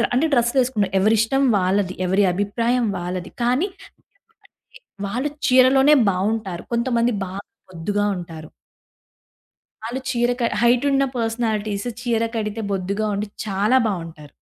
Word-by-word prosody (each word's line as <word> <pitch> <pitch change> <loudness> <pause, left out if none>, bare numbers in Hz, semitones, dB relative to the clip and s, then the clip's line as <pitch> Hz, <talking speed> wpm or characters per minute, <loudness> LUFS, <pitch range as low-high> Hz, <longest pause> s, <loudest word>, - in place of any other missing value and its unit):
Draw - - +3
అంటే 290 +6 +3
డ్రెస్సులేసుకునే 240 -3 +2
ఎవరిష్టం 225 +6 +2
వాళ్ళది. 185 0 0
ఎవరి 190 +3 +2
అభిప్రాయం 230 +5 0
వాళ్ళది. 180 0 -5
కానీ 255 +10 +2 0.2
ఎందుకంటే, - - -25 0.3
వాళ్ళు 250 +8 -2 0.2
చీరలోనే 265 +3 +6 0.2
బావుంటారు. 190 -1 -2
కొంతమంది 235 0 +1
బా 185 - -8 0.4
బొద్దుగా 200 +4 -2
ఉంటారు. 165 -3 -8 1.4
ఆళ్ళు 250 +3 -4
చీర 240 -1 +1
క - - 0 0.2
హైటున్న 270 +3 +3
పర్సనాలిటీసు 225 -1 -2
చీర 235 -2 0
కడితే 215 0 -3
బొద్దుగా 200 +3 -2
ఉండి 205 +2 -2 0.2
చాలా 210 +5 +1
బావుంటారు. 165 -7 -5
220 Hz, 115 wpm, -21 LUFS, 195-245 Hz, 1.4 s, చీరలోనే